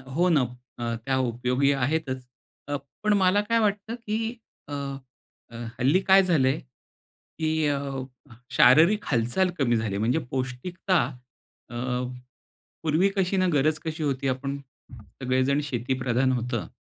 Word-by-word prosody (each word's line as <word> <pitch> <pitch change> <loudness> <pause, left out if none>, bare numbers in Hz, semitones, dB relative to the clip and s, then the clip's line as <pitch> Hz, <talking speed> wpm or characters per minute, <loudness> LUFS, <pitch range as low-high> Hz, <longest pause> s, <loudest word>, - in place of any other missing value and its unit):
हो 175 +3 +3
ना, 155 -5 +4 0.4
अ, 115 -1 -2
त्या 130 -1 +1
उपयोगी 125 +4 +1
आहेतच. 135 -1 -1 0.8
पण 210 0 +3
मला 190 +1 +4
काय 230 +2 +1
वाटतं 210 +1 0
की 225 -3 -4 0.5
अ, 145 - -7 0.8
अ, 115 - -12 0.2
हल्ली 140 +9 +4
काय 195 0 +7
झाले 155 -8 +3
की 155 +5 -5
अ, 145 -1 +1 0.7
शारीरिक 165 +12 +5
हालचाल 125 +10 +1
कमी 120 -4 +3
झाली, 110 -3 -1
म्हणजे 115 +9 +1
पौष्टिकता 135 +9 -1 0.7
अ, 120 - -9 1.1
पूर्वी 160 +5 +3
कशी 190 0 +1
ना 185 - +3
गरज 155 +2 +2
कशी 160 0 -3
होती, 140 -2 -1
आपण 135 +2 -2 0.3
सगळेजण 130 +5 -1
शेतीप्रधान 130 -1 0
होतं. 125 0 -2
140 Hz, 125 wpm, -26 LUFS, 125-180 Hz, 1.1 s, काय